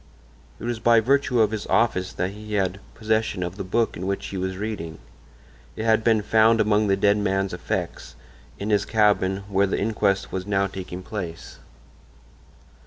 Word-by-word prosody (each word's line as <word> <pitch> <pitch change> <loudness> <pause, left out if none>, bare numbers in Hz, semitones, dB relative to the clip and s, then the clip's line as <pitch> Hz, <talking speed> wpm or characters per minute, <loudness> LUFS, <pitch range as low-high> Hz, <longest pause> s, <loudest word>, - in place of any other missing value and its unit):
It - - -10
was 120 -1 -2
by 115 0 +5
virtue 125 0 +2
of 110 -1 +3
his 110 -2 -4
office 95 -6 +1
that 90 +1 -2
he 105 +1 -6
had 95 -1 0 0.2
possession 110 -3 0
of 90 +1 -4
the 100 - -5
book 115 +5 0
in 90 +2 -5
which 100 0 -2
he 95 - -5
was 95 0 -3
reading; 95 -7 -5 0.8
it 110 - -4
had 110 0 +3
been 110 -2 +3
found 110 +2 +4
among 105 0 +3
the 95 0 +2
dead 100 +1 +3
man's 95 -2 0
effects—in 65 - -6
his 100 -1 +3
cabin, 100 -3 +2
where 100 0 +2
the - - -1
inquest 100 -2 0
was 95 +1 -4
now 100 -1 +2
taking 95 -1 -7
place. 90 -5 -7
100 Hz, 175 wpm, -24 LUFS, 95-110 Hz, 0.8 s, by